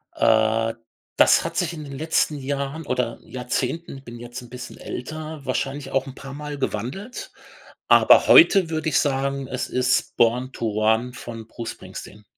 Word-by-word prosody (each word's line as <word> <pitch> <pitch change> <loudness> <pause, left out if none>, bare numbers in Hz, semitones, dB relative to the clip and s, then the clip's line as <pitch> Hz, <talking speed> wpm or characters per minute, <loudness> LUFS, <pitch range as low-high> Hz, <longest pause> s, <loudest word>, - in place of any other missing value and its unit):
Äh. 110 0 +3 0.4
Das - - +6
hat 165 0 -4
sich 175 -2 0
in 155 - -7
den 140 -2 -8
letzten 155 -1 +1
Jahren 140 +3 -3
oder 125 -2 -1
Jahrzehnten, 130 +5 -3
ich 135 - -14
bin 120 0 -9
jetzt 120 +1 -8
'n 120 - -13
bisschen 125 0 -9
älter, 155 +4 -6
wahrscheinlich 135 0 -3
auch 135 0 0
'n 135 - -9
paarmal 145 +2 -7
gewandelt. 135 - -4 0.6
Aber - - +6
heute 195 - +7
würde 160 0 -1
ich 150 - +2
sagen, 135 -1 -1
es 130 0 -3
ist 125 0 +1
„Born 125 +3 +2
to 115 - -3
Run“ 110 +4 +1
von 115 -2 -8
Bruce 115 0 -6
Springsteen. 105 +1 -11
130 Hz, 165 wpm, -23 LUFS, 120-150 Hz, 0.6 s, heute